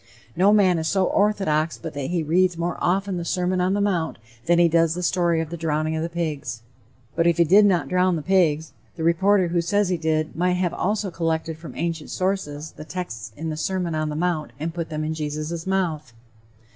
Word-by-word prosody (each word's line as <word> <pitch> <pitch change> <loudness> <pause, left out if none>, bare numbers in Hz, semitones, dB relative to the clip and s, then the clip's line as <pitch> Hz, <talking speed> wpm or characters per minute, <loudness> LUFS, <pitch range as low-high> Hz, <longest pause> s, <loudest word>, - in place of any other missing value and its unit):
No 190 +4 +4
man 190 -5 +4
is 160 - -2
so 190 +1 +2
orthodox 180 -8 +1
but 160 -2 -7
that 140 -2 -3
he 175 -2 0
reads 175 +3 +2
more 170 +1 -2
often 190 +1 0
the 170 - -3
Sermon 180 +1 0
on 185 +2 +1
the - - 0
Mount 180 -5 0 0.3
than 175 0 +4
he 175 0 +6
does 165 0 +2
the 180 - -4
story 170 -2 +2
of 160 -1 -6
the 170 - -4
drowning 155 -1 -1
of 160 - -2
the 165 - -2
pigs." 155 -8 -4 0.5
But 165 0 +2
if 170 - +3
he 170 - +6
did 200 +6 +6
not 175 -8 +1
"drown 180 +2 +2
the 155 - -4
pigs," 160 -6 +2 0.2
the 160 - -5
reporter 185 +2 +3
who 170 0 +1
says 205 +3 +1
he 180 - +1
did 155 -1 -1
might 180 +2 +1
have 180 -1 0
also 205 0 -1
collected 165 -1 -2
from 160 +1 -11
ancient 165 -2 -3
sources 160 -6 -2
the - - -10
texts 120 - -6
in 160 +1 -3
the - - -3
Sermon 180 0 -2
on 155 0 -1
the 150 - -4
Mount 165 -1 -1
and 160 +2 -3
put 170 -2 -4
them 155 -1 -3
in 155 +1 -2
Jesus' 155 +2 -4
mouth. 160 -9 -1
170 Hz, 220 wpm, -23 LUFS, 155-180 Hz, 0.5 s, he